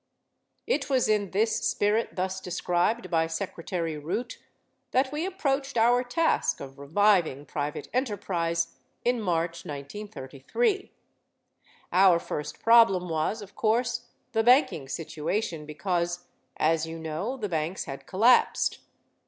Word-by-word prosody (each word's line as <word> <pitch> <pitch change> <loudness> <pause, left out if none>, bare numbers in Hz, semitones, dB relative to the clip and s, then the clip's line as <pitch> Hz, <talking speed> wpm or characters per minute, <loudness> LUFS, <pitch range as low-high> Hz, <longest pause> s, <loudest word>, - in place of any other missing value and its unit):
It 485 - 0
was 260 -2 +2
in 210 -2 +1
this 215 +4 +1
spirit 210 +3 0
thus 190 0 -2
described 180 +3 0
by 165 -1 +2
Secretary 165 -2 -3
Root 220 +12 -4 0.5
that 260 +1 +1
we 310 +5 -2
approached 280 -8 -1
our 240 +2 +4
task 320 +7 +1
of 135 0 -9
reviving 165 -2 +2
private 145 0 -4
enterprise 180 -9 -1 0.3
in 245 -1 +2
March, 170 -3 -1
1933. 195 - -3 1.0
Our 185 -1 +6
first 150 -2 -5
problem 225 -6 +5
was, 165 +7 -1
of 200 - -13
course, 240 +2 0 0.2
the 225 -3 +2
banking 240 - +4
situation 160 +2 -3
because, 175 +2 -2 0.3
as 160 +1 +2
you 165 0 -6
know, 160 +11 -3
the 215 -5 -3
banks 165 +2 -2
had 135 - -8
collapsed. 225 +6 +3
190 Hz, 120 wpm, -27 LUFS, 165-235 Hz, 1.0 s, Our